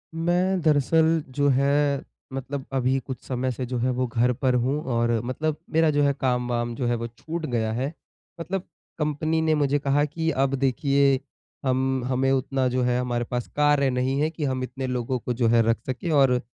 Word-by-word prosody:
मैं 180 +3 +1
दरअसल 160 +1 +3
जो 145 +2 +1
है, 140 +1 +2 0.3
मतलब 135 +1 -4
अभी 130 0 +1
कुछ 130 0 -7
समय 130 0 -2
से 125 +1 -4
जो 125 0 -3
है 120 +2 +1
वो 125 +1 0
घर 120 +2 +1
पर 130 +1 0
हूँ 130 +5 0
और 120 0 +2
मतलब 150 +5 -2 0.2
मेरा 160 0 +4
जो 145 0 +2
है 140 0 +3
काम-वाम 125 -2 0
जो 125 - -2
है 120 - +1
वो 115 0 -4
छूट 160 +8 -6
गया 115 -5 -1
है, 130 +6 -2 0.5
मतलब 180 +2 -3 0.4
कंपनी 155 +1 0
ने 160 -1 +2
मुझे 145 -1 +1
कहा 140 +1 +2
कि 160 +2 -2
अब 135 -1 +1
देखिए, 135 +1 +2 0.5
हम 130 0 +1
हमें 130 +1 +1
उतना 135 0 +1
जो 125 +1 0
है 125 0 +1
हमारे 120 -1 -1
पास 125 -1 -2
कार्य 145 -2 +3
नहीं 130 +2 0
है, 155 - +2
कि 160 -1 -6
हम 130 -2 -1
इतने 130 +1 -4
लोगों 125 0 -2
को 125 - -3
जो 120 -1 +1
है 115 0 +5
रख 115 - +3
सकें 130 +6 -3
और 135 -4 +4
135 Hz, 200 wpm, -25 LUFS, 125-145 Hz, 0.5 s, है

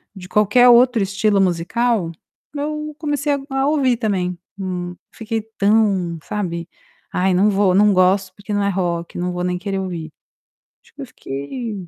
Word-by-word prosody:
de 185 -1 -10
qualquer 215 +4 +5
outro 240 -1 +5
estilo 200 +1 +1
musical, 185 +2 0 0.4
eu 300 +1 -4
comecei 290 -1 0
a 280 - -1
a 270 +1 0
ouvir 265 -6 +2
também, 185 -6 -1 0.2
hum, 180 -2 -4 0.2
fiquei 225 0 -3 0.2
tão, 200 -5 +2
sabe, 170 -4 -4 0.4
"Ai 185 +1 +1
não 200 +4 +4
vou 195 -2 +2
não 205 +1 +5
gosto 185 +1 +2
porque 205 +1 -7
não 205 - +1
é 200 - +1
rock, 175 -3 -2
não 180 +1 -2
vou 175 0 -3
nem 180 0 -1
querer 195 +1 -3
ouvir", 170 -4 -5 0.7
acho - - -25
que 290 - -9
eu - - -5
fiquei 200 - -6
200 Hz, 165 wpm, -20 LUFS, 180-235 Hz, 0.7 s, qualquer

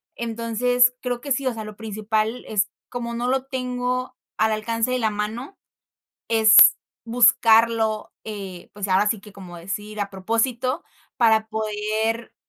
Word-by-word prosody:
Entonces, 235 +2 +1
creo 245 -1 -3
que 280 - -6
sí, 270 +1 0
o 255 - 0
sea, 220 -1 -6
lo 215 -1 -10
principal 215 +2 -2
es 205 -2 +1 0.2
como 235 -1 -5
no 240 +1 -2
lo 265 +1 0
tengo 255 -1 -3 0.2
al 220 - +2
alcance 230 +2 -1
de 255 - 0
la 220 -2 +1
mano, 220 - -5 0.7
es 220 -2 +7 0.3
buscarlo, 225 -2 +3
eh, 195 -5 -8
pues, 205 -1 -4
ahora 195 +2 +3
sí 220 0 0
que 205 0 -15
como 185 -3 -11
decir, 205 +5 -6
a 200 -1 -2
propósito, 235 - -1 0.3
para 220 -3 +3
poder 220 +1 -2
225 Hz, 150 wpm, -23 LUFS, 210-245 Hz, 0.7 s, es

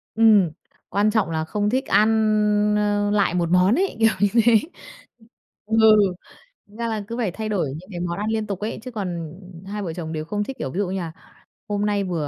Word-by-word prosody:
Ừm, 210 -6 +5 0.4
quan 205 +1 +2
trọng 215 -5 +1
là 160 -1 -2
không 205 +4 -1
thích 260 +4 0
ăn, 215 +1 +4 0.7
ơ, 205 0 +1
lại 200 -4 +2
một 175 -2 0
món 180 +5 +4
ấy, 385 +3 0
kiểu 225 0 +5
như 205 - +4 0.2
thế. 235 -1 +6 1.1
Ừ, 220 +1 0 0.9
ra 230 +3 -5
là 215 -2 -3
cứ 230 - -4
phải 225 -6 -1
thay 220 +3 -5
đổi 195 -8 0
những 185 +5 -14
cái 175 -3 -6
món 175 -1 -3
ăn 210 +2 -2
liên 220 -1 -1
tục 200 -3 -4
ấy, 215 +2 -4
chứ 255 - -7
còn, 175 -8 -4
ừm, 180 -2 -13
hai 205 +2 -5
vợ 170 -4 -4
chồng 160 -2 -6
đều 155 -1 -4
không 205 +5 -2
thích, 265 +4 -7
kiểu, 135 - -4
ví 175 - -5
dụ 200 -2 0
như 190 +1 -3
là 165 -2 -5 0.6
hôm 205 0 -1
nay 205 -1 0
vừa 170 -6 -2
205 Hz, 225 wpm, -22 LUFS, 180-215 Hz, 1.1 s, thế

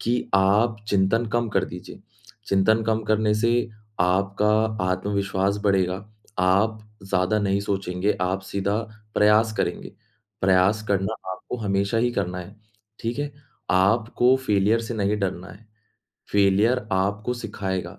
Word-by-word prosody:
कि 120 +1 0
आप 105 +4 +3
चिंतन 100 +4 +2
कम 120 -1 +1
कर 95 -3 +1
दीजिए, 90 +1 -10 0.5
चिंतन 110 +3 +3
कम 110 0 0
करने 110 0 +2
से 115 +2 +1 0.5
आपका 100 +3 +2 0.4
आत्मविश्वास 100 +1 -1
बढ़ेगा, 95 -2 +2 0.4
आप 100 +4 +2 0.2
ज़्यादा 95 +2 +1
नहीं 100 -1 0
सोचेंगे, 100 0 -1
आप 95 +1 0
सीधा 100 +2 -2 0.4
प्रयास 105 +1 +4
करेंगे, - - -3 0.5
प्रयास 95 +3 +3
करना 100 +2 0 0.2
आपको 95 - -6
हमेशा 100 0 0
ही 120 +1 +2
करना 90 -5 -2
है, 90 - -9 0.5
ठीक 115 +4 -3
है? 145 -1 -3 0.4
आपको 110 +6 +3
फेलियर 105 +3 +3
से 115 +1 -5
नहीं 105 0 0
डरना 95 -1 -3
है, 110 +1 -15 0.7
फेलियर 105 +4 +3
आपको 100 +5 0
सिखाएगा, 95 -5 -4
100 Hz, 130 wpm, -24 LUFS, 95-110 Hz, 0.7 s, प्रयास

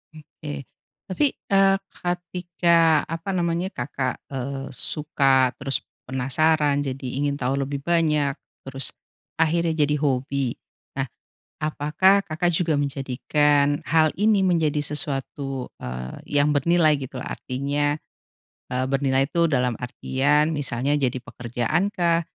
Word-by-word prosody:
Oke. 150 -1 -8 0.4
Tapi, 200 +10 +2 0.2
eee, 195 0 +5 0.3
ketika 175 -2 +2
apa 165 +3 -5
namanya, 175 0 0
Kakak, 130 -2 -3
eee, 135 +1 -4
suka 135 -4 +2
terus 135 0 0 0.3
penasaran, 145 +3 +2
jadi 135 -1 -5
ingin 145 0 0
tahu 130 +1 0
lebih 140 +1 -3
banyak. 150 -4 +2 0.3
Terus 135 -1 -2 0.5
akhirnya 165 +1 +2 0.2
jadi 150 - +1
hobi. 135 -2 0 0.5
Nah, - - 0 0.6
apakah 155 +6 +3
Kakak 165 +2 0
juga 165 -1 +1
menjadikan 145 +1 +1
hal 160 0 +4
ini 210 -1 +4
menjadi 160 -5 +2
sesuatu, 135 -2 -3
eee, 65 - -2
yang 150 - +2
bernilai 155 +1 +3
gitu 130 -1 -7
loh. - - -9
Artinya, 145 +3 -1 0.8
eee, 125 +1 0
bernilai 135 0 +2
itu 170 +1 +2
dalam 125 -5 +1
artian 140 +5 +1
misalnya 140 -2 -1
jadi 130 -2 0
pekerjaan 120 - -1
kah? 170 -4 +2
145 Hz, 120 wpm, -24 LUFS, 135-165 Hz, 0.8 s, eee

